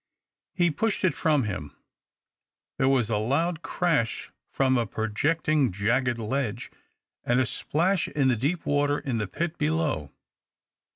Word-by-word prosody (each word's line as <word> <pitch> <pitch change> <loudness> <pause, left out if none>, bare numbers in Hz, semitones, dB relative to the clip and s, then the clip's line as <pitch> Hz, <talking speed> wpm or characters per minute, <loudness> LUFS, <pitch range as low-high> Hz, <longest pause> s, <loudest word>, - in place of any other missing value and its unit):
He 175 -2 +3
pushed 215 +8 -1
it 185 -5 +3
from 150 -3 +2
him. 85 -9 -5 1.0
There 130 - +3
was 125 -5 +2
a 105 - +2
loud 160 +9 0
crash 165 -9 -1 0.2
from 130 -1 +2
a 120 -2 +1
projecting 145 +6 +1
jagged 120 +6 +1
ledge, 115 +1 -3 0.5
and 120 +1 +2
a 130 - +3
splash 170 +8 0
in 140 -3 +1
the 130 - +3
deep 145 +9 -1
water 145 0 +2
in 125 -6 -2
the 105 - -2
pit 165 - -3
Lelow. 150 - 0
135 Hz, 140 wpm, -26 LUFS, 115-160 Hz, 1.0 s, He